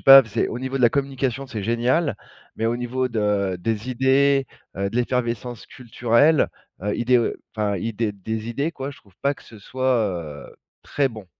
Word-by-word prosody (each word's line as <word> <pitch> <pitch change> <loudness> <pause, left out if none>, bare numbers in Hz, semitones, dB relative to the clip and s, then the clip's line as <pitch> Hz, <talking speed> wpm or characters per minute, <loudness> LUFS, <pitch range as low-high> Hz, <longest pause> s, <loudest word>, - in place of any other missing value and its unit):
pas 135 0 +11
v 110 - -14
c'est 105 - 0
au 120 - -4
niveau 130 +1 -3
de 130 - 0
la 120 - +8
communication, 135 -1 -1
c'est 110 -6 -5
génial 120 - +1 0.4
mais 115 - 0
au 115 - +1
niveau 125 +1 -1
de 105 -4 0
des 110 +4 -2
idées, 135 +1 +3 0.3
heu, 100 0 -1
de 115 - -4
l'effervescence 120 -2 -1
culturelle, 125 +4 +2 0.3
heu, 105 +1 -1
idéo 120 -1 +3 0.2
enfin, 105 -2 0
idée 110 +2 -1
des 110 +3 -5
idées 140 +8 -1
quoi, 135 -1 -5
je 140 - -12
trouve 100 -3 -24
pas 140 +1 +2
que - - -18
ce 110 - -13
soit, 130 +4 0 0.5
heu, - - -16 0.3
très 140 -2 0
bon. 110 -5 -10
120 Hz, 190 wpm, -23 LUFS, 110-135 Hz, 0.5 s, pas